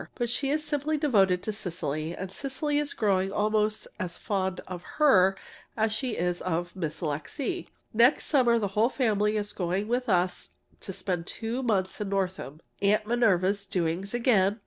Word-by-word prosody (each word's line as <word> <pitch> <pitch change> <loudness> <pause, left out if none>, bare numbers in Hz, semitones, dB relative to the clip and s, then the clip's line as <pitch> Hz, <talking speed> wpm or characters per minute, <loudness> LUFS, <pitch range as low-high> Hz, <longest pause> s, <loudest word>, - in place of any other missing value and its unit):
But 240 -2 -1
she 275 +2 0
is 305 +1 0
simply 295 +1 0
devoted 195 -11 +3
to 215 - -2
Cecily, 165 -4 -3
and 190 0 -5
Cecily 285 +5 -1
is 295 -1 -3
growing 195 -3 +1
almost 215 +1 0
as 180 -3 -4
fond 190 -3 -2
of 180 -2 -6 0.2
her 195 -11 +5 0.4
as 220 0 +1
she 235 +1 -2
is 175 +1 -1
of 175 0 -2
Miss 165 -4 -4
Alixe. 180 - -3 0.3
Next 235 +5 +4
summer 245 -5 +4
the 205 -3 -1
whole 215 +5 +2
family 215 -5 +1
is 205 0 -3
going 185 +3 -1
with 245 +1 -1
us 180 -1 +1 0.3
to - - -6
spend 180 -2 -2
two 230 +3 -3
months 200 -6 0
in 205 - -2
Northam 185 -6 -2 0.2
(Aunt 210 +1 +3
Minerva's 200 -4 +2
doings 185 +4 -1
again!) 215 -4 +3
205 Hz, 170 wpm, -28 LUFS, 185-240 Hz, 0.4 s, her